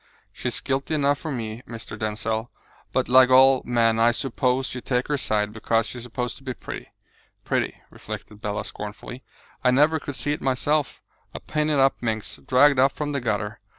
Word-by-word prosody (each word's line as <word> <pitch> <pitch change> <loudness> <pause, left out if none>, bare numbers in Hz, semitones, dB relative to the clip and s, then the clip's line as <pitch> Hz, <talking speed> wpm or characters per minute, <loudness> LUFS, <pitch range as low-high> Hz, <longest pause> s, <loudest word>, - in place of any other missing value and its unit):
"She - - -5
is - - -3
guilty 140 +3 -1
enough 145 -1 +2
for 155 - -5
me, 115 -3 -4
Mr. 115 -1 -7
Denzil; 110 +1 -2 0.4
but - - 0
like 130 +1 +7
all 130 0 +7
men, 115 -2 +2
I 115 +1 +5
suppose 130 +1 0
you 125 - -5
take 125 +1 -1
her 145 - +1
side, 105 -3 0
because 115 0 +1
she 125 - -6
is - - -9
supposed 125 0 -4
to 135 - -16
be 130 -2 -4
pretty. - - -8 0.6
Pretty!" - - -1
reflected 105 -1 -9
Bella 105 -1 -3
scornfully, 105 +4 -7 0.4
"I 125 - +5
never 150 +5 +4
could 145 -1 -6
see 145 - -1
it - - -5
myself; 145 +3 0 0.3
a - - -4
painted 150 -1 0
up 135 0 +3
minx, 110 -3 -3
dragged 140 +1 +4
up 135 +1 +4
from 150 -1 -3
the 140 -2 -2
gutter. 105 -1 -2
125 Hz, 190 wpm, -24 LUFS, 115-140 Hz, 0.6 s, like